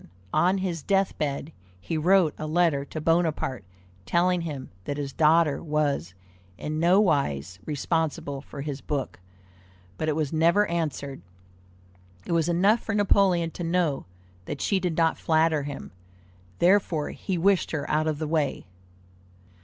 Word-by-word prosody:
On 185 +2 +3
his 180 -4 -2
death 195 +3 +1
bed 145 0 -2 0.3
he 130 - -4
wrote 175 0 +3
a 155 - -4
letter 160 -3 +2
to 155 - -6
Bonaparte 160 -7 0 0.4
telling 175 - +2
him 145 -6 -6
that 145 - -3
his 140 -2 -4
daughter 160 -1 +3
was 145 - -1 0.4
in 155 +1 -3
nowise 140 - +2
responsible 150 -2 -2
for 140 0 -9
his 140 -1 -5
book, 145 - -3 0.8
but 155 - 0
it 150 - 0
was 155 -1 -1
never 170 +6 +4
answered. 150 - -3 1.0
It - - -5
was 165 0 +2
enough 195 +7 +3
for 220 - -3
Napoleon 190 -5 +3
to 175 - -6
know 165 -4 0 0.4
that - - -5
she 195 - +1
did 175 -3 -2
not 165 -1 +2
flatter 160 -1 +2
him; 140 0 -7 0.7
therefore 175 -4 +2
he 190 -2 -3
wished 190 +2 +2
her 145 -3 -3
out 155 +1 +1
of 155 -2 0
the 155 0 -3
way. 150 -3 -1
160 Hz, 145 wpm, -26 LUFS, 145-175 Hz, 1.0 s, never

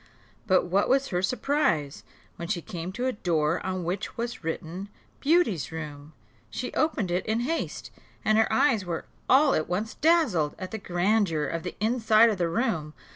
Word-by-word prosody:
But 190 -2 +4
what 190 +3 +1
was 270 +1 +2
her 180 -2 0
surprise, 190 - 0 0.3
when 170 - -6
she 175 - -1
came 170 +1 -6
to 245 +4 -3
a 260 - +2
door 165 -5 0
on 185 -1 -3
which 180 +4 -4
was 235 -3 -4
written, 165 +4 -5 0.3
Beauty's 280 - +2
room! 150 -1 -7 0.4
She - - -5
opened 230 - 0
it 180 +1 0
in 220 +2 +1
haste, 325 +7 -3 0.3
and 215 - +4
her 225 0 +3
eyes 220 -1 +3
were 170 -2 -4 0.2
all 275 +2 +6
at 155 - 0
once 205 +5 -2
dazzled 275 - +2
at 185 - -6
the 220 - -4
grandeur 180 -3 +1
of 165 +2 -3
the 180 - -6
inside 225 0 +4
of 200 - -4
the 170 -1 +1
room. 165 - -1
190 Hz, 180 wpm, -27 LUFS, 165-230 Hz, 0.4 s, all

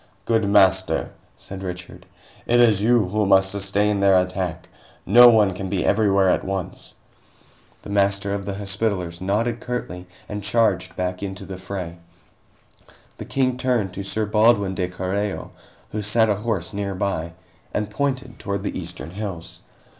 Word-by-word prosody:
"Good 110 -3 +1
Master," 95 -4 +3 0.2
said 95 0 -8
Richard, 90 -1 -7 0.4
"it 120 +1 +4
is 110 -5 +5
you 110 -3 +3
who 105 +1 0
must 95 0 +4
sustain 100 +1 0
their 100 -1 +5
attack. 90 -2 -3 0.4
No 120 +4 +8
one 105 -4 +4
can 95 +1 -5
be 95 -1 -1
everywhere 100 -2 +3
at - - +2
once." 95 -2 -5 0.9
The - - -8
Master 100 0 +1
of 100 0 -3
the 100 - -3
Hospitallers 95 -3 -2
nodded 110 +5 0
curtly 90 -8 -5 0.2
and 105 -1 -5
charged 105 -3 +1
back 90 0 -3
into 95 0 -6
the 95 -1 -8
fray. 90 -3 -6 1.2
The - - -6
King 130 -2 0
turned 125 -7 0
to 100 - -5
Sir 110 +2 -1
Baldwin 105 -2 +3
de 90 -1 -1
Carreo, 95 +3 -3 0.4
who 105 - -3
sat 110 +2 +2
ahorse 105 -3 -2
nearby, 100 -4 -2 0.4
and 105 0 -2
pointed 130 +1 -2
toward 100 -1 -3
the - - -3
eastern 85 -1 -7
hills. 95 -4 -6
100 Hz, 150 wpm, -22 LUFS, 95-105 Hz, 1.2 s, No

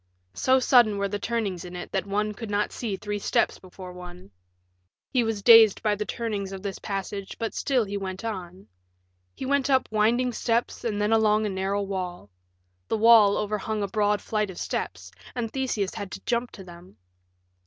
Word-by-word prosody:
So 260 - +3
sudden 240 -5 +4
were 200 0 0
the 205 +1 -3
turnings 210 -6 -2
in 180 0 -9
it 180 - -7
that 195 +1 -2
one 210 +1 -1
could 225 0 -7
not 205 0 0
see 220 -5 -3
three 205 0 -4
steps - - +1
before 185 0 -11
one. 180 - -11 0.8
He 250 -3 +2
was 220 -3 -2
dazed 225 -3 +7
by 210 -1 +2
the 210 0 -3
turnings 210 -4 -3
of 195 0 -7
this 200 -1 -4
passage, 195 -1 -5
but 225 -1 -3
still 260 -4 +1
he 200 -1 -4
went 190 +2 -5
on. 185 -3 -6 0.7
He - - -6
went 280 0 +1
up 265 -1 +3
winding 235 +4 +2
steps 230 +1 -1
and 215 -3 -2
then 210 +2 +2
along 215 -1 +3
a - - -1
narrow 195 +1 -1
wall. 180 - -5 0.6
The - - 0
wall 220 -2 +6
overhung 210 0 -2
a - - -1
broad 205 +1 0
flight 210 -2 -1
of 185 - -9
steps, - - -4 0.2
and 230 -3 -3
Theseus 245 -7 -1
had 205 -3 -6
to 195 - -7
jump 240 0 0
to 195 - -10
them. 175 -4 -14
210 Hz, 190 wpm, -26 LUFS, 195-225 Hz, 0.8 s, dazed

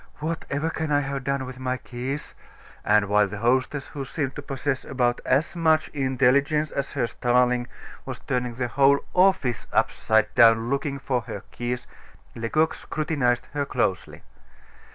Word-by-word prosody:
Whatever 160 0 -3
can 160 -2 -3
I 145 0 +3
have 140 -1 -4
done 140 -1 -1
with 130 0 -9
my 130 0 -1
keys?" 130 +4 -5 0.5
And 105 0 +4
while 105 0 +3
the 105 +2 -6
hostess, 130 +5 +1
who 140 - -6
seemed 135 0 -3
to - - -5
possess 135 -1 -3
about 125 -2 0
as 145 +6 +2
much 160 -2 +2
intelligence 140 +2 +2
as 140 0 -3
her - - +1
starling, 125 +1 +1 0.4
was - - -6
turning 125 -2 -2
the 125 0 -1
whole 140 +3 +4
office 180 - +2
upside 110 -1 +2
down 115 0 +5
looking 140 0 -1
for 130 -2 -1
her 100 - -6
keys, 120 0 -4 0.5
Lecoq 155 +8 +1
scrutinized 140 -6 -1
her 145 -1 0
closely. 115 -9 -2
130 Hz, 155 wpm, -25 LUFS, 120-145 Hz, 0.5 s, down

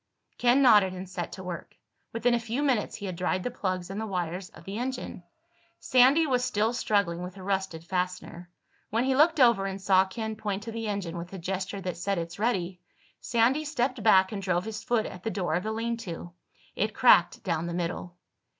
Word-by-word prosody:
Ken 245 +3 +4
nodded 205 -7 +6
and 185 +1 -7
set 175 -1 -5
to 190 - -8
work. 180 -2 -7 0.3
Within 235 +2 +1
a 240 - +2
few 235 +5 -2
minutes 255 -7 +1
he 205 - -7
had 185 -2 -4
dried 185 +1 -1
the 250 - -2
plugs 185 -5 -3
and 200 +3 -4
the 220 - -3
wires 180 -1 -3
of - - -15
the 200 +3 -5
engine. 255 -6 -4 0.6
Sandy 260 +6 +5
was 250 -4 +1
still 225 -2 +1
struggling 200 -8 0
with 180 +1 -7
the 190 - -10
rusted 190 -4 -2
fastener. 180 -1 -3 0.4
When 225 +3 +1
he 265 0 +1
looked 315 +3 +4
over 235 -6 +5
and 195 0 -5
saw 190 -1 +4
Ken 220 +3 -5
point 205 -2 -3
to 230 - -6
the 225 0 -4
engine, 185 -5 -3
with 175 +2 -8
a - - -5
gesture 190 +2 -4
that 180 -1 -4
said 195 +3 -1
"It's 170 +2 -5
ready," 185 -6 -1 0.4
Sandy 240 +6 +2
stepped 265 -4 -1
back 190 -3 +5
and 205 -2 -4
drove 180 -1 0
his 220 -1 -5
foot 235 -3 +1
at 180 - -8
the 225 - -2
door 190 -6 -2
of 175 - +1
the 220 - -3
lean 230 +1 -2
to. 175 -4 -7 0.4
It 210 +1 -1
cracked 180 -8 +5
down 170 -2 -1
the 170 - -4
middle. 175 0 -4
195 Hz, 215 wpm, -28 LUFS, 180-230 Hz, 0.6 s, nodded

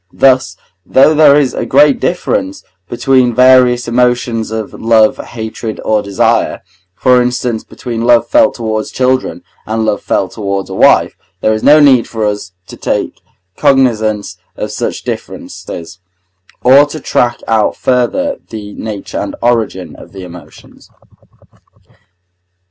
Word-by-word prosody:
Thus, 130 -9 +2 0.3
though 135 +9 +4
there 150 -2 +5
is 145 -3 +1
a - - -3
great 145 +1 +3
difference 270 +10 -2 0.3
between 125 -1 +1
various 125 -1 +4
emotions 120 -2 0
of 110 -1 -5
love, 110 -1 +2
hatred, 110 -1 -7
or 110 -1 +1
desire, 100 -1 0 0.3
for 125 +3 +3
instance 125 -2 -2
between 115 -3 -6
love 120 0 +3
felt 295 -2 +3
towards 110 -2 -3
children, 130 -9 -1 0.2
and 110 0 -1
love 105 -2 -1
felt 95 - -1
towards 100 -3 -4
a - - -5
wife, - - +3 0.3
there 110 - +2
is 110 - -3
no 150 +1 +6
need 135 -5 +4
for 110 -2 -3
us 105 -1 -3
to - - -12
take - - -3 0.3
cognizance 115 -7 +1 0.2
of - - -5
such - - -4
differences, 85 +1 -8 0.6
or 135 +4 +6
to 155 +2 -7
track 120 -3 -1
out 110 -2 +1
further 130 - -1
the 105 -2 -8
nature 105 -3 -6
and - - -5
origin 110 -8 -1
of - - -15
the 95 -1 -9
emotions. 85 -4 -14
120 Hz, 135 wpm, -12 LUFS, 110-130 Hz, 0.6 s, no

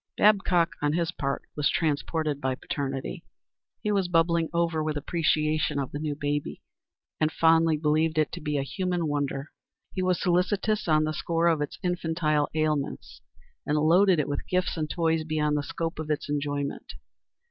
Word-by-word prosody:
Babcock, 195 -5 +4
on 145 0 +1
his 170 0 0
part, 140 -5 -3
was 150 -1 +2
transported 155 -1 -1
by 130 -1 0
paternity. 135 0 -4 0.6
He 210 - 0
was 195 -3 +1
bubbling 165 -1 +2
over 170 -2 0
with 155 -1 -1
appreciation 155 -1 0
of 140 -2 -2
the 145 - -4
new 150 -1 -2
baby, 145 0 -3 0.6
and 155 0 +2
fondly 165 -1 +4
believed 155 +1 +1
it 155 -1 +2
to - - -6
be 150 -1 -1
a 135 - 0
human 180 +3 -2
wonder. 145 -1 -2 0.4
He 185 - -2
was 185 -1 +1
solicitous 190 +4 +1
on 155 -1 +4
the 155 0 -1
score 165 +1 0
of 165 -3 +3
its 145 - -4
infantile 160 -4 0
ailments, 155 -2 -2 0.4
and 150 - 0
loaded 175 +4 +4
it 150 - 0
with 145 - -3
gifts 185 0 0
and 155 -2 -2
toys 165 -2 +1
beyond 155 -1 0
the 145 - +1
scope 165 +2 -4
of 155 -1 -5
its 150 - -1
enjoyment. 145 -1 -3
155 Hz, 170 wpm, -27 LUFS, 145-170 Hz, 0.6 s, Babcock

